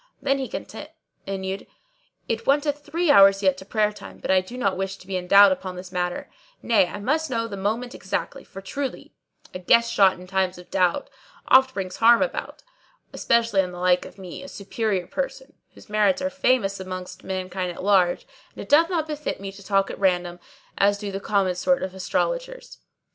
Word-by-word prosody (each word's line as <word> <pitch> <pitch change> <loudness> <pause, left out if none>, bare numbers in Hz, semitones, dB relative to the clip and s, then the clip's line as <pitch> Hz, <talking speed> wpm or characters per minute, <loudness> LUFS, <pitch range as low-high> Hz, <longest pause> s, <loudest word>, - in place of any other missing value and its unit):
Then 275 0 0
he 265 - -3
continued, 195 -9 -7 0.6
"It 225 0 -3
wanteth 290 +1 +2
three 335 +1 +1
hours 195 -4 +6
yet 190 -1 +3
to 190 - -11
prayer 210 +1 +1
time; - - -11
but - - -3
I 190 -1 +4
do 215 +7 -10
not 200 -6 0
wish 195 +1 -3
to - - -16
be 190 0 -4
in 180 -1 -3
doubt 200 +1 +8
upon 185 0 -3
this 180 0 -9
matter; 180 -1 -3 0.4
nay, 205 -6 +3
I 205 - -7
must 310 +9 0
know 230 -2 -1
the 205 - -6
moment 220 +6 -2
exactly, - - -4
for 195 - -11
truly, 270 +7 -5 0.4
'A 185 - -5
guess 235 +6 +3
shot 190 -4 +4
in 180 - -11
times 190 -1 -1
of 180 - -14
doubt, 185 +8 +1 0.4
oft 260 0 +5
brings 190 -2 -4
harm 235 +1 +6
about;' - - -5 0.5
especially 230 -4 +2
in 180 -1 -4
the - - -8
like 180 0 +3
of - - -13
me, 185 -3 -9
a 280 - -9
superior 200 -4 -2
person - - -5 0.2
whose - - -16
merits 210 -2 +2
are 280 0 -2
famous 255 -8 +1
amongst 185 -1 -7
mankind 185 -1 -3
at 175 - -9
large; 190 -3 +3 0.3
and - - -7
it - - -15
doth 325 +4 +5
not 335 -4 0
befit 300 -1 -4
me 195 0 -6
to 200 +1 -14
talk 195 0 +1
at - - -9
random, 180 -2 0 0.4
as 200 +1 +3
do 205 -1 -5
the 195 - -4
common 195 -2 +1
sort 265 +10 +1
of 185 0 -4
astrologers." - - -3
200 Hz, 200 wpm, -24 LUFS, 185-250 Hz, 0.6 s, doubt